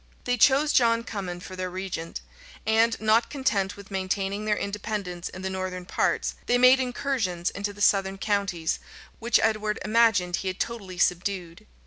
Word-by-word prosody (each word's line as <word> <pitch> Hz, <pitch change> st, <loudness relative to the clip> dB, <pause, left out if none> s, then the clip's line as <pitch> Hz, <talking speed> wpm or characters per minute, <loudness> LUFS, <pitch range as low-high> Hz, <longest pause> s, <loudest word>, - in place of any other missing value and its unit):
They 245 Hz, -, +1 dB
chose 275 Hz, +5 st, +4 dB
John 230 Hz, -1 st, +4 dB
Cummin 190 Hz, -6 st, -5 dB
for 185 Hz, -, -8 dB
their 185 Hz, 0 st, -3 dB
regent; 180 Hz, -3 st, -5 dB, 0.4 s
and, 225 Hz, +1 st, +3 dB
not 220 Hz, +2 st, +3 dB
content 205 Hz, -9 st, -1 dB
with 200 Hz, 0 st, -12 dB
maintaining 195 Hz, +2 st, -2 dB
their 210 Hz, -1 st, +1 dB
independence 200 Hz, -3 st, -4 dB
in 185 Hz, -, -9 dB
the 190 Hz, -, -1 dB
northern 185 Hz, -1 st, -4 dB
parts, -, -, 0 dB
they 245 Hz, -, +4 dB
made 255 Hz, +1 st, +7 dB
incursions 245 Hz, -9 st, -1 dB
into 205 Hz, +1 st, -3 dB
the 205 Hz, 0 st, -11 dB
southern 195 Hz, -1 st, +3 dB
counties, 195 Hz, -5 st, -1 dB, 0.4 s
which 235 Hz, +1 st, +3 dB
Edward 215 Hz, -1 st, +1 dB
imagined 215 Hz, -5 st, +3 dB
he 195 Hz, -, -4 dB
had 185 Hz, 0 st, -3 dB
totally 200 Hz, -6 st, -4 dB
subdued. 180 Hz, +2 st, -1 dB
200 Hz, 160 wpm, -26 LUFS, 185-225 Hz, 0.4 s, made